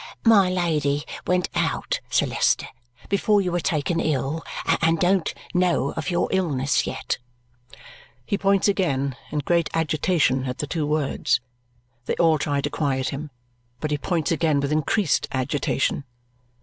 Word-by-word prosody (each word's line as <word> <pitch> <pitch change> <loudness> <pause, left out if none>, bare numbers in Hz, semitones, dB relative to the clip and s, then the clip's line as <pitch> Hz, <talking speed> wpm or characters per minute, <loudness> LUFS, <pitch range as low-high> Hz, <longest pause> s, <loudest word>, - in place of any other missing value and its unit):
"My 205 -5 +6
Lady 150 -5 0 0.2
went 180 0 +2
out, - - -1
Sir - - +2
Leicester, - - +1 0.4
before 205 +1 +2
you 185 -2 0
were 175 - 0
taken 160 0 0
ill, 155 +1 -1 0.4
and 165 +1 +3
don't 180 0 +2 0.2
know 180 -6 +2
of - - -4
your 175 - +1
illness 145 -8 +1
yet." - - -3 1.1
He 200 - 0
points 195 0 +2
again, 140 -10 0 0.2
in 150 -1 -1
great 170 -1 +2
agitation, 155 -4 +1
at 125 -1 -3
the - - -2
two 150 0 -2
words. 150 -2 +1 0.7
They - - 0
all 160 -2 +3
try 145 -1 0
to - - -2
quiet 135 -4 0
him, 150 +2 -5 0.5
but 155 +2 -3
he 150 - +1
points 165 -1 -1
again 155 -3 +2
with 140 +1 -1
increased 155 - +1
agitation. 140 +1 0
155 Hz, 150 wpm, -24 LUFS, 140-180 Hz, 1.1 s, My